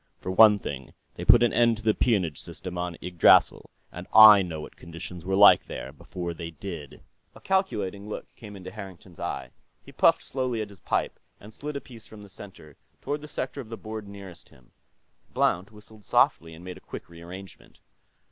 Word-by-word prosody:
For 95 - -5
one 105 +2 +7
thing, 70 -9 -8 0.2
they - - -7
put - - +6
an 120 - +2
end 120 -1 +3
to 110 - -12
the 110 -1 +3
peonage 95 - 0
system 90 -1 -8
on 90 -1 -4
Yggdrasill, 90 -1 +4 0.2
and 90 +1 -9
I 110 -2 +10
know 85 -4 -5
what - - -11
conditions 85 +1 -8
were 95 - 0
like, 100 +1 +7
there, - - -7
before 85 -2 -6
they 85 0 -7
did." 80 -3 -9 0.3
A - - -13
calculating 105 - -2
look - - -6
came 105 -3 -11
into 95 -2 -9
Harrington's 95 -4 -11
eye. - - -5 0.3
He - - -14
puffed - - +3
slowly 130 -3 -3
at 105 -1 -5
his 100 - -15
pipe - - -2 0.2
and 105 +2 -14
slid 150 +4 -7
a 140 - -4
piece 115 -4 -14
from 105 -1 -13
the 100 - -14
center 95 -7 -13 0.2
toward 145 +1 -4
the 150 - -9
sector 140 -1 -5
of 115 - -13
the 115 - -7
board 110 -1 -8
nearest 100 -4 -12
him. 65 - -23 0.6
Blount 90 +4 +1
whistled 105 0 -15
softly 80 -3 +1
and 85 +2 -13
made 90 -1 -8
a - - -15
quick - - -9
re 85 0 -14
arrangement. 95 +3 -12
100 Hz, 200 wpm, -26 LUFS, 85-110 Hz, 0.6 s, I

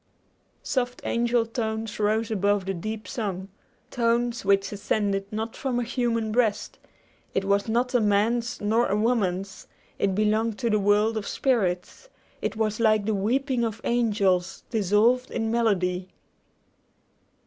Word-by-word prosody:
Soft 250 -2 -2
angel 235 0 +1
tones 220 -2 -3
rose 215 +2 +1
above 205 -1 +1
the 195 - -1
deep 215 +3 -5
song, 195 -6 -4 0.4
tones 235 0 0
which 195 0 +2
ascended 200 -1 -1
not 220 +1 -4
from 255 -3 -2
a - - 0
human 230 -2 -1
breast: 220 -2 0 0.6
it 195 - +1
was 200 +1 +1
not 245 +3 0
a 245 - +4
man's 225 +4 +1
nor 220 +3 +2
a 200 - 0
woman's; 200 -4 -1 0.3
it 195 -1 +1
belonged 215 +1 +1
to 235 -3 -1
the 215 - +3
world 210 +2 +2
of 205 - -4
spirits; 215 - -1 0.3
it - - -2
was 215 0 -1
like 215 -2 +3
the 220 - +1
weeping 245 +5 0
of 225 -1 -2
angels 200 -6 +1
dissolved 225 +4 +2
in 225 -1 -2
melody. 185 -6 +1
220 Hz, 140 wpm, -26 LUFS, 200-235 Hz, 0.6 s, a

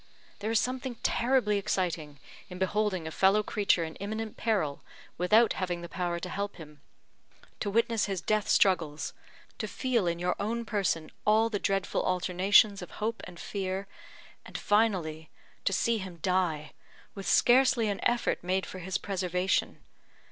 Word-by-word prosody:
There 210 +2 -3
is 225 -1 +3
something 255 +1 -2
terribly 235 -4 +2
exciting 165 -7 -2 0.3
in 180 - -8
beholding 190 -2 0
a 160 - -4
fellow 195 +5 +3
creature 200 -5 +1
in 160 -1 -6
imminent 215 +2 -4
peril, 195 -11 -1 0.3
without 215 +6 +4
having 180 -2 -3
the - - -5
power 175 0 -2
to 180 - -4
help 200 +2 -4
him. 150 -3 -13 0.8
To 205 - -2
witness 230 +1 +2
his 195 -2 -2
death 215 +3 0
struggles 160 -6 +2 0.5
to - - -2
feel 240 -8 0
in 170 0 0
your 180 +1 0
own 230 +3 -2
person 195 -7 -1
all 220 +2 +3
the 205 - -1
dreadful 195 0 0
alternations 185 +3 +3
of 180 - -8
hope 225 +2 -2
and 175 -2 -11
fear 190 -1 -3 0.6
and, - - -7
finally, 180 -8 +1 0.4
to - - +3
see 225 +4 +1
him 185 -3 -7
die, 175 -5 0 0.4
with 195 -1 -7
scarcely 250 -2 +4
an 200 -1 -2
effort 240 -6 +1
made 185 +1 0
for 185 - -8
his 185 +2 -2
preservation. 185 -1 -1
195 Hz, 155 wpm, -29 LUFS, 180-215 Hz, 0.8 s, without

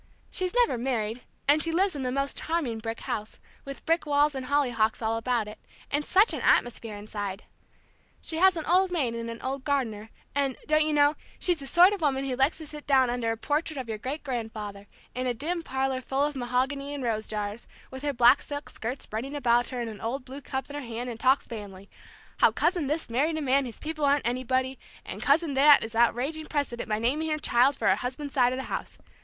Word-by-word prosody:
She's 370 +3 -1
never 475 - +3
married, 235 -2 -2 0.3
and 295 +2 +5
she 330 - +1
lives 370 +1 +2
in 280 - -4
the 255 -1 -1
most 275 +1 -1
charming 300 -9 -1
brick 225 +1 -5
house, 215 0 -4 0.3
with 275 0 -8
brick 330 -1 +1
walls 290 +1 +3
and 260 -1 -5
hollyhocks 245 -6 +1
all 225 0 0
about 230 -1 0
it, 210 +1 -10 0.3
and 290 +1 +1
such 395 +8 +4
an - - -3
atmosphere 230 -3 +2
inside! 205 -1 -5 0.8
She 320 - -2
has 375 0 +5
an 320 - -3
old 365 +2 +3
maid 280 -10 0
and 230 0 -4
an 230 0 -6
old 265 +1 -3
gardener, 230 -7 -1 0.2
and 275 -2 0
don't 310 0 +3
you 310 - 0
know 290 0 +4 0.2
she's 355 -3 +1
the 275 - -7
sort 355 +7 +6
of 400 - -4
woman 275 -3 +1
who 255 - -1
likes 270 +5 +2
to 320 - -7
sit 300 0 -9
down 260 -3 +4
under 240 -2 -1
a 225 - -3
portrait 300 +4 -1
of 260 -3 -4
your 220 -2 -4
great 275 +7 -4
grandfather, 220 -6 -5 0.3
in 255 +1 -2
a 245 - 0
dim 335 +7 -2
parlor 265 -3 -1
full 270 +2 0
of 295 0 -1
mahogany 265 +3 -1
and 275 - -5
rose 220 -2 -1
jars, 210 +1 -4 0.2
with 260 0 -7
her 290 0 0
black 245 +1 +5
silk 290 0 -6
skirts 245 +4 -5
spreading 250 +7 -5
about 240 -3 +2
her, 250 -2 -4
and 235 - -3
an 210 - -11
Old 250 +4 -3
Blue 270 +2 -8
cup 265 0 -4
in 285 - -8
her 290 - -3
hand, 240 0 -5
and 230 - -8
talk 265 +3 +4
family, 200 -3 -9 0.5
how - - +5
cousin 340 -4 +1
this 310 +3 -1
married 290 +7 +1
a - - -2
man 275 0 +3
whose 235 -3 -6
people 310 -1 -5
aren't 285 0 +2
anybody, 255 +2 0 0.3
and - - -6
cousin 295 +1 +3
that 285 +2 +7
is 225 0 -6
outraging 255 +7 +1
precedent 275 -6 -2
by 215 - +1
naming 280 +8 0
her 305 - 0
child 270 -1 +3
for - - 0
her - - +4
husband's 265 +3 -5
side 250 -2 +4
of 255 - -2
the 265 - -3
house. - - -5
265 Hz, 230 wpm, -27 LUFS, 235-295 Hz, 0.8 s, that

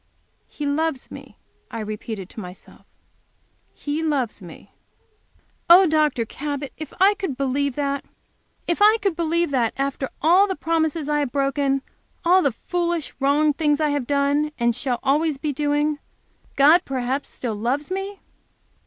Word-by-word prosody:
"He 295 - -6
loves 285 -1 -1
me," - - -11 0.3
I 230 - -6
repeated 215 -2 -5
to - - -9
myself. 180 -2 -11 0.8
"He 295 +2 -4
loves 275 -9 -1
me! 170 -3 -13 1.0
Oh, 365 +3 +9
Dr. 305 -7 +2
Cabot, 285 +3 -5
if 310 -2 -8
I 390 +2 +6
could 385 -11 -4
believe 275 0 0
that! 280 -1 -1 0.6
If 345 +3 -1
I 425 +2 +7
could 390 -5 +1
believe 335 -1 0
that, 240 -4 +1
after 275 -1 -2
all 360 +6 +5
the 380 - -2
promises 320 -3 -1
I 295 0 +1
have 285 -4 -1
broken, 275 -1 0 0.4
all 365 +2 +5
the 280 - +2
foolish, 345 -3 -1
wrong 290 +2 +3
things 295 -1 +1
I 305 -1 +2
have 285 -4 -1
done 285 +1 +1
and 235 -1 +1
shall 245 -1 -1
always 295 +2 +1
be 295 +1 -3
doing, 295 +1 0 0.6
God 310 +6 +6
perhaps 265 +1 -2
still 240 -3 -4
loves 255 - -2
me!" 390 +1 -4
290 Hz, 155 wpm, -23 LUFS, 270-320 Hz, 1.0 s, Oh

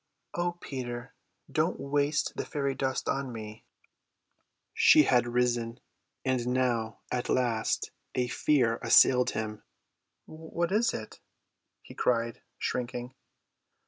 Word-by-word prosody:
"O 175 0 -1
Peter, 125 -7 -6 0.4
don't - - +1
waste 145 +2 0
the - - -2
fairy 140 -2 -2
dust 130 -1 -2
on 135 -2 -1
me." 110 -1 -8 1.1
She 155 - +7
had 125 -3 +3
risen; 120 -1 0 0.5
and 130 -2 0
now 120 -3 0
at 125 -1 -2
last 120 -3 0 0.2
a 125 -1 +1
fear 120 -3 +2
assailed 125 -1 +6
him. 105 -1 -4 0.6
"What 160 +2 -4
is 225 +3 +2
it?" 110 - -8 0.6
he - - -12
cried, 115 -1 0 0.2
shrinking. 125 0 -3
125 Hz, 110 wpm, -29 LUFS, 120-140 Hz, 1.1 s, She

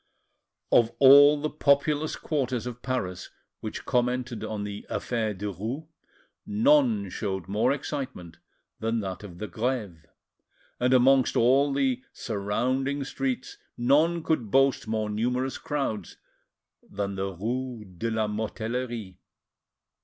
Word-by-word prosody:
Of 115 -2 +5
all 145 +2 +8
the 155 +1 -1
populous 150 +1 +2
quarters 130 -6 -2
of 125 0 -6
Paris 110 -9 -3 0.3
which - - -6
commented 125 -1 0
on 105 -1 -3
the 100 0 -6
"affaire 110 -4 -2
Derues," 105 - -4 0.6
none 225 0 +3
showed 95 -5 -3
more 110 +6 +2
excitement 130 - -5 0.4
than 115 0 0
that 95 -2 -5
of 90 -4 -10
the 105 - -4
Greve, 105 -6 -3 0.7
and 125 +1 +2
amongst 130 0 +4
all 135 +4 +4
the 135 -2 +1
surrounding 130 +7 -1
streets 135 -2 -3 0.2
none 155 +7 +3
could 140 -11 0
boast 135 0 +3
more 110 -1 -1
numerous 125 +5 -1
crowds 125 - -3 0.7
than 100 0 -3
the 95 0 -3
rue 120 +4 -4
de 95 +5 -4
la 110 -1 0
Mortellerie. 110 -1 -4
125 Hz, 120 wpm, -27 LUFS, 105-135 Hz, 0.7 s, all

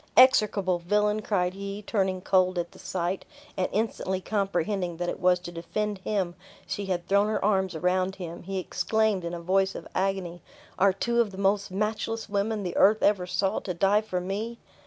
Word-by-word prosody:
"Execrable 205 -8 +5
villain!" 210 +4 +1
cried 180 -4 0
he, 200 +1 -6
turning 190 -3 0
cold 185 -1 +2
at 175 0 -2
the - - -16
sight, 185 0 -2 0.3
and 185 - 0
instantly 200 -3 -1
comprehending 195 -2 -1
that 175 0 -2
it - - -4
was 180 0 +4
to 180 -1 -8
defend 205 +4 -3
him 190 -3 -1 0.3
she 200 -1 -4
had 175 -2 -2
thrown 200 +1 +3
her 215 -2 0
arms 190 -3 +1
around 185 +3 +1
him, 170 -3 -7
he 195 +2 -4
exclaimed, 215 +1 0
in 170 +1 -3
a - - -5
voice 190 +3 +1
of - - -7
agony, 185 -3 -1 0.4
"Are 195 +1 +6
two 235 +5 +1
of 225 - 0
the 190 - -11
most 200 +1 +1
matchless 215 +3 -2
women 205 +1 -1
the 180 -2 -4
earth 215 +2 +5
ever 195 -3 +3
saw 195 +3 0
to 180 -4 -5
die 200 +4 +3
for 185 -4 -3
me!" 205 +6 -4
195 Hz, 190 wpm, -27 LUFS, 180-210 Hz, 0.4 s, Are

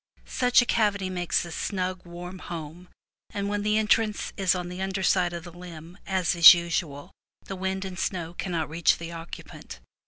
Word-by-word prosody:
Such 245 -1 +3
a - - -5
cavity 205 -5 +1
makes 175 -1 -1
a 170 - -9
snug, 185 0 -3
warm 180 +2 -8
home, 170 +1 -8 0.4
and 200 0 -3
when 205 0 -1
the 210 +1 +1
entrance 215 0 +1
is 190 -1 +2
on 180 -1 -4
the 180 +1 -7
under 190 0 -2
side 180 0 +2
of 170 -1 -6
the 175 -1 -11
limb, 175 -1 -11
as 190 -3 +1
is 170 +1 +10
usual, 165 -4 -3 0.3
the 195 - -6
wind 190 +1 -3
and 185 -1 -7
snow 175 -3 -3
cannot 170 -3 -3
reach 165 +1 +2
the 170 0 -7
occupant. 165 - -9
180 Hz, 185 wpm, -26 LUFS, 170-195 Hz, 0.4 s, is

